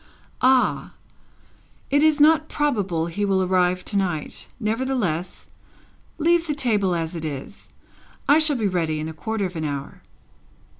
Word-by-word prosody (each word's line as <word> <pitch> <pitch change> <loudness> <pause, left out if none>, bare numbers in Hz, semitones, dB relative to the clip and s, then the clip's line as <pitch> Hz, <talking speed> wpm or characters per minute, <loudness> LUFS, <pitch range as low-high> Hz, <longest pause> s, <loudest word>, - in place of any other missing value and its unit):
"Ah! 255 -1 +2 1.0
It 285 +1 +4
is 310 -1 +4
not 310 +1 +4
probable 205 - 0
he 170 +5 -3
will 195 -2 +2
arrive 180 0 +1
to 205 - -6
night; 175 -6 -2
nevertheless, 220 -7 -2 0.7
leave 335 +1 +2
the 295 - -1
table 210 -10 +1
as 165 +1 -3
it 165 - -5
is. 150 +5 -7 0.6
I 295 +2 +6
shall 310 -2 +3
be 220 -5 0
ready 165 -4 -1
in 155 - -4
a 160 - -6
quarter 205 +7 -3
of 180 -1 -6
an 160 - -3
hour." 145 -2 -5
195 Hz, 150 wpm, -23 LUFS, 165-270 Hz, 1.0 s, I